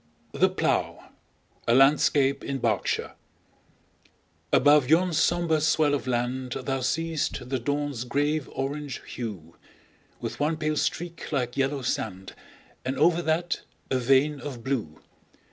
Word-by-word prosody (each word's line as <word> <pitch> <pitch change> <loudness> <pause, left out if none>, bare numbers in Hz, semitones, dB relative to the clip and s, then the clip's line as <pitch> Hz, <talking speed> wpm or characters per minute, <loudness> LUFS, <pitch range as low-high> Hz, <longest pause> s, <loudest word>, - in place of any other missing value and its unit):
The - - +3
Plough - - -1 0.6
A 115 - +4
LANDSCAPE 140 0 +4
IN 135 - -2
BERKSHIRE 110 -8 -1 1.4
ABOVE 145 -1 +5
yon 175 +3 +4
sombre 160 0 +2
swell 155 -1 +3
of 140 -2 -2
land 125 +1 -1
Thou 135 -1 -2
see'st 155 -1 -1
the 130 0 -1
dawn's 145 -1 -2
grave 145 +3 0
orange 140 +1 -4
hue, 95 -9 -7 0.6
With 115 0 -5
one 155 +2 +1
pale 155 -1 -1
streak 170 +2 -3
like 125 -4 -1
yellow 135 0 0
sand, 95 -5 -3 0.5
And 130 +1 -2
over 170 +3 +4
that 170 +1 0 0.3
a 130 - +2
vein 135 +4 +3
of 130 -6 -7
blue. 115 - -3
140 Hz, 130 wpm, -26 LUFS, 125-155 Hz, 1.4 s, ABOVE